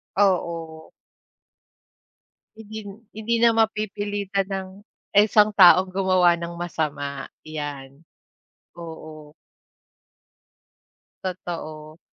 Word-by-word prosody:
Oo. 170 -5 0 1.6
Hindi 220 0 -10 0.3
hindi 220 +2 -3
na 235 - +7
mapipilitan 205 -3 -1
ng 190 -1 -4 0.5
ang 205 - +8
isang 210 0 +4
taong 185 0 +7
gumawa 185 -2 +3
ng 170 0 -6
masama, 145 -5 -3 0.2
yan. 145 -1 -7 0.7
Oo. 155 -2 -10 1.9
Totoo. 160 -4 -6
175 Hz, 75 wpm, -23 LUFS, 155-200 Hz, 1.9 s, ang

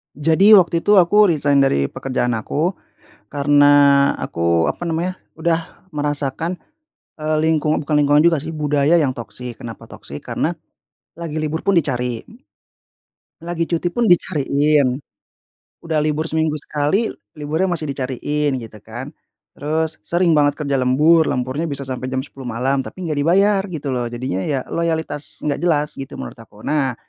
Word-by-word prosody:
Jadi 165 +8 +5
waktu 170 -3 +4
itu 205 +4 +3
aku 205 +3 +5
resign 145 -4 +2
dari 70 - +2
pekerjaan 130 -2 -2
aku, 155 - -1 0.6
karena 145 -1 +5
aku 85 0 +1
apa 175 - -5
namanya 170 +3 -2 0.2
udah 165 +3 -3
merasakan, 145 +2 -2 0.6
eee, 155 0 -1
lingkungan 155 -1 +1
bukan 150 0 -2
lingkungan 145 0 +4
juga 165 +2 +4
sih, 160 - -5
budaya 150 +1 +2
yang 135 -3 0
toxic. 120 0 -8
Kenapa 115 -2 -9
toxic 70 +1 -10
karena - - -2 0.6
lagi 160 -2 -5
libur 155 +1 -3
pun 195 -3 +4
dicari, 125 -5 -2 1.2
lagi 170 0 -3
cuti 170 +1 -1
pun 235 +7 -1
dicariin, 145 -5 +2 0.8
udah 160 -2 -1
libur 155 +1 0
seminggu 160 -1 0
sekali 150 +10 0 0.2
liburnya 155 +4 -1
masih 155 -2 -4
dicariin 140 +2 -2
gitu 110 -1 -11
kan, 120 +5 -7 0.5
terus 160 +2 -1
sering 175 0 +2
banget 145 -2 +4
kerja 140 -1 0
lembur, 150 +6 +4
lemburnya 130 +6 -2
bisa 140 -3 -4
sampai 130 -1 -5
jam 130 0 -2
10:00 135 -2 -11
malam, 130 +3 -1
tapi 185 - -9
enggak 155 -4 -2
dibayar 195 +6 +3
gitu 160 -6 -6
loh 125 -2 -1
jadinya 120 -5 -3
ya 135 -4 -1
loyalitas 160 -3 -1
nggak 145 -1 -1
jelas 150 -4 0
gitu 135 0 -7
menurut - - -8
aku. 105 -2 -15
Nah, 140 -4 0
150 Hz, 150 wpm, -20 LUFS, 135-165 Hz, 1.2 s, Jadi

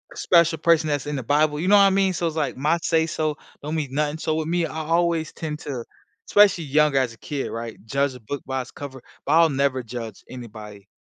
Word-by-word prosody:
special 170 -2 +3
person 165 -2 +3
that's 145 0 -1
in 150 - -2
The 130 - -3
Bible. 150 +3 +2
You 180 - -2
know 205 - +6
what - - +7
I 195 - +6
mean? 195 -1 +2
So 170 -1 -1
it's 160 - -4
like 155 - -1
my 150 +5 +2
say 160 -1 +2
so 155 -1 -2 0.3
don't 155 +2 -3
mean 150 -4 -2
nothing. 150 +2 0
So 155 -1 -1
with 160 0 -2
me, 175 0 +1
I - - -7
always 165 0 0
tend 150 -1 -5
to 130 -5 -5 0.5
especially 200 -5 +5
young 150 0 +3
as 130 -3 +1
a - - -17
kid, 145 -2 -4
right, 115 0 -5
judge 135 +3 0
a 125 - -10
book 140 +6 -5
by 130 0 -2
its 125 - -10
cover, 135 -3 -9 0.2
but 145 - +1
I'll 165 0 +6
never 135 -2 0
judge 115 -2 -7
anybody 105 -5 -10
150 Hz, 240 wpm, -23 LUFS, 130-160 Hz, 0.5 s, what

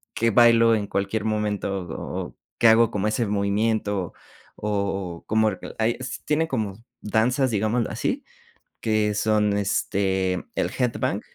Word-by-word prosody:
que 115 0 +2
bailo 115 0 +6
en 105 -2 0
cualquier 100 +2 -2
momento, 105 -2 -1
o 80 - -5
o - - -22 0.2
que 115 - +5
hago 115 0 +6
como 105 -2 -1
ese 115 +1 0
movimiento, 100 -1 0 0.4
o 100 -4 -3
como, 110 0 +3 0.3
hay, 115 +1 +1
s 130 - -6
tienen 155 +2 +1
como 110 -6 -3 0.2
danzas, 125 +5 +1
digámoslo 110 +2 0
así, 250 - -2 0.6
que 110 -2 +1
son, 105 0 +2
este, 95 -2 0
el - - 0
headbang. 125 -2 -1
110 Hz, 135 wpm, -24 LUFS, 100-115 Hz, 0.6 s, bailo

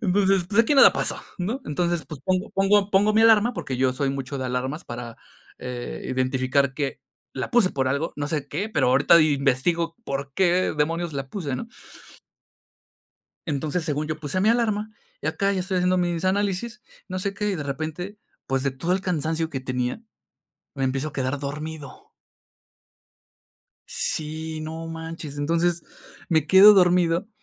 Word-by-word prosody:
Entonces: 195 -2 +2
"Pues, 210 +2 +4
aquí 290 +6 +1
nada 275 - +8
paso", - - -1 0.2
¿no? 215 +9 -2
Entonces, 170 0 -1
pues, 150 -2 -9
pongo 185 +2 0
pongo 195 +1 +2
pongo 205 +2 +4
mi 220 - +4
alarma, 225 +1 +5
porque 135 - -4
yo 130 0 +2
soy 135 +1 -1
mucho 135 0 -4
de 130 - -3
alarmas 130 +6 -3
para, 120 -1 -7 0.4
eh, 125 -1 -6
identificar 130 +1 +1
que 140 -2 -3 0.3
la - - -4
puse 235 -7 +4
por 130 -1 -1
algo, 140 +5 -1
no 145 0 -3
sé 150 -4 -2
qué, 205 +3 -3
pero 215 - +1
ahorita 140 +6 +6
investigo 155 +3 +1
por 140 0 -4
qué 185 -1 +2
demonios 165 +2 -1
la 135 -1 -4
puse, 145 -9 -4
¿no? 230 - -6 1.8
Entonces, 155 +2 -2
según 150 -1 -1
yo, 155 0 -4
puse 155 +5 -2
mi 210 - +3
alarma, 220 -2 +1 0.3
y - - -5
acá 195 +5 0
ya 190 - -1
estoy 190 +1 -2
haciendo 180 0 +2
mis 175 0 -1
análisis, 205 +5 -1 0.3
no 185 0 -3
sé 200 +1 -3
qué, 210 +1 -1
y 190 - -1
de 150 - -4
repente, 160 +8 -5 0.3
pues, 135 0 0
de 140 - +1
todo 165 +7 -2
el 190 - +1
cansancio 160 -2 -1
que 135 -4 -4
tenía, 125 - -2 0.8
me 135 - -2
empiezo 135 +3 -1
a - - -19
quedar 130 +1 -2
dormido. 150 0 -7 1.8
Sí, 155 0 -3
no 160 +1 -6
manches. 160 -2 -7
Entonces, 170 +3 +1 0.5
me 160 -3 +2
quedo 195 +5 +9
dormido 180 0 +3
160 Hz, 170 wpm, -24 LUFS, 140-185 Hz, 1.8 s, quedo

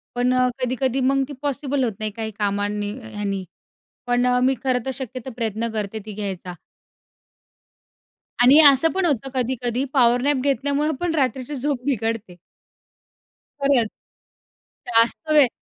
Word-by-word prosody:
पण 245 +1 +1
अ, 255 0 +3
कधी-कधी 255 +1 0
मग 275 0 +2
ती 290 - -8
पॉसिबल 285 -1 -1
होत 230 -3 -1
नाही 215 -1 -2
काही 220 +1 -5
कामांनी, 205 0 -1
ह्यानी 205 -3 -4 0.6
पण 245 0 +2 0.2
मी 265 +1 +3
खरं 250 -3 +1
तर - - 0
शक्यतो 255 -1 -6
प्रयत्न 225 -1 -2
करते 215 0 -3
ती 215 - -6
घ्यायचा. 190 -3 -5 1.9
आणि 270 +5 +7
असं 280 +4 +3
पण 380 -1 0
होतं 275 -4 0
कधी-कधी 250 0 0
पॉवर 245 -2 +4
नॅप 285 +1 +2
घेतल्यामुळे 285 +2 0
पण 350 -2 -1
रात्रीची 265 0 -1
झोप 270 -1 -2
बिघडते. 225 -7 -2 1.3
खरंच. 275 -5 +3 1.0
जास्त 235 +6 +2
वेळ 295 -3 +6
250 Hz, 135 wpm, -22 LUFS, 220-275 Hz, 1.9 s, आणि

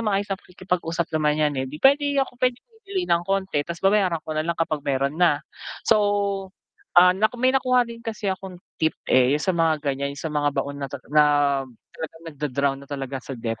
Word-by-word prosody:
maayos 205 -2 -1
pakikipag-usap 180 -3 -3
naman 150 -1 +2
yan, 150 -1 +2
eh, 130 - -1
di 145 - -7
pwede 285 +1 +4
ako, 265 - -6
pwedeng 250 -1 0 0.2
bibili 395 -3 -3
ng 170 - +3
konti 195 -5 0
tas 170 +3 -6
babayaran 195 -5 +2
ko 155 - -4
nalang 155 +2 -1
kapag 160 -2 -1
meron 140 +3 0
na, 155 -4 +4 0.4
so, 220 -2 +4 1.0
ah, 180 +1 +8 0.3
may 255 +1 +3
nakuha 255 -2 +3
din 230 0 -10
kasi 220 -4 -3
akong 190 -1 -8 0.2
tip, 160 0 +1
eh, 130 0 +5
yung 150 - -5
sa 185 - +1
mga 165 -2 +2
ganyan 140 0 -2
yung - - -8
sa 160 - -3
mga 145 -1 +1
baon 140 +1 -2
na, 140 - -3 0.2
na 150 0 +6 0.7
talagang 165 +1 -8
nagda-drown 140 -2 -1
na 140 - -14
talaga 135 -1 -4
sa 135 - -7
debt. 115 -1 -4
165 Hz, 195 wpm, -24 LUFS, 145-195 Hz, 1.0 s, ah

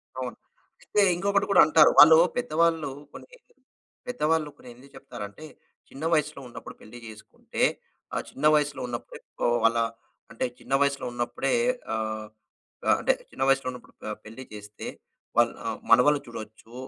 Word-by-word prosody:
అవును. - - -5 0.5
అయితే 210 - +1
ఇంకొకటి 200 +2 +1
కూడా 195 - +7
అంటారు. 155 0 +6
వాళ్ళు 160 +2 +10 0.2
పెద్దవాళ్ళు 165 - +1 0.2
కొన్ని, - - -11 0.8
పెద్దవాళ్ళు 160 -10 0
కొన్ని 125 - -14
ఎందుకు 135 +3 -18
చెప్తారంటే, 120 +2 -9 0.4
చిన్న 140 +4 -7
వయసులో 150 -2 0
ఉన్నప్పుడు 120 - -10
పెళ్లి 115 +3 -12
జేసుకుంటే 110 -1 -6 0.5
ఆ - - 0
చిన్న 150 - -5
వయస్సులో 145 -2 0
ఉన్నప్పుడే 120 -1 -7 0.4
వాళ్ళ 115 +1 +3 0.5
అంటే 115 - -2
చిన్న - - -6
వయసులో 140 -1 +1
ఉన్నప్పుడే 120 +3 -2 0.4
ఆహ్, 110 -1 -3 0.6
ఆహ్, - - +5
అంటే - - +2 0.2
చిన్న - - -3
వయసులో 135 -1 +2
ఉన్నప్పుడు 125 -1 -13
ప 110 - -4
పెళ్లి 115 +4 -10
చేస్తే, 105 0 -9 0.5
వాల్ 120 0 +5 0.2
ఆహ్, 110 -1 -4
మనవళ్లు 140 +5 +6
చూడొచ్చు. 110 0 -10
135 Hz, 140 wpm, -26 LUFS, 115-155 Hz, 0.8 s, వాళ్ళు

